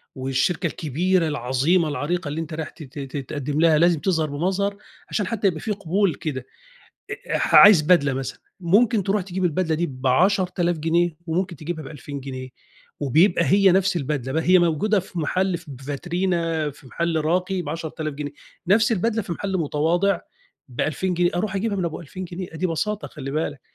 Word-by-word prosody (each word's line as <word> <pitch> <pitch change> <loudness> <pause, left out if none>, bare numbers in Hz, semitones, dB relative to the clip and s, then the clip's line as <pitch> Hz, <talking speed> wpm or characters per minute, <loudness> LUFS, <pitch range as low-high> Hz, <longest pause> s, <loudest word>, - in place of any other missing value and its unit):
والشركة 135 +7 0
الكبيرة، 165 +4 0
العظيمة، 150 +5 +1
العريقة، 150 +3 -2
اللي 155 +3 -3
أنت 160 0 -7
رايح 155 0 -4
ت 160 - -12
ت 140 +1 -10
ت 135 +1 -5
تقدِّم 145 +1 -2
لها 160 -2 +5
لازم 170 -1 +4
تظهر 160 -2 0
بمظهر 190 +7 -1 0.3
عشان 205 -3 -1
حتى 210 -2 0
يبقى 160 -4 -1
في 215 - -3
قبول 195 -1 0
كده، 130 -5 -5 0.7
أ - - -3
أح - - -1
عايز 195 -6 +9
بدلة 150 -4 +4
مثلًا، 135 0 -4 0.2
ممكن 205 +4 +3
تروح 200 +2 0
تجيب 185 0 -3
البدلة 165 -1 +1
دي 170 +2 0
ب10.000 175 +6 +1
جنيه 165 +1 +1
وممكن 175 +2 -1
تجيبها 155 +1 -5
ب2000 145 -1 -8
جنيه 130 -1 -7 0.5
وبيبقى 170 - +3
هي 195 0 +5
نفس 190 0 +2
البدلة، 135 -3 -2
ب - - -2
هي 180 +3 +5
موجودة 180 +5 +2
في 180 -1 -9
محل 185 +3 0
في 175 - -16
ب 130 -1 -10
فاترينا 165 +1 -1
في 140 0 -17
محل 170 +4 -1
راقي 180 +3 0
ب10.000 155 -1 -4
جنيه 145 0 -5 0.3
نفس 215 +4 +4
البدلة 225 +2 0
في 180 - -5
محل 195 +2 -2
متواضع 170 +4 +1 0.5
ب2000 155 +8 -1
جنيه، 175 0 +2
أروح 190 +2 -1
اجيبها 205 +1 -1
من 185 - -1
أبو 165 - -3
2000 180 +3 -7
جنيه 180 +1 -6
أ - - -5
دي 185 - 0
بساطة 205 +5 -2
خلِّ 135 -4 -7
بالك، 145 -2 -2
170 Hz, 180 wpm, -23 LUFS, 150-185 Hz, 0.7 s, عايز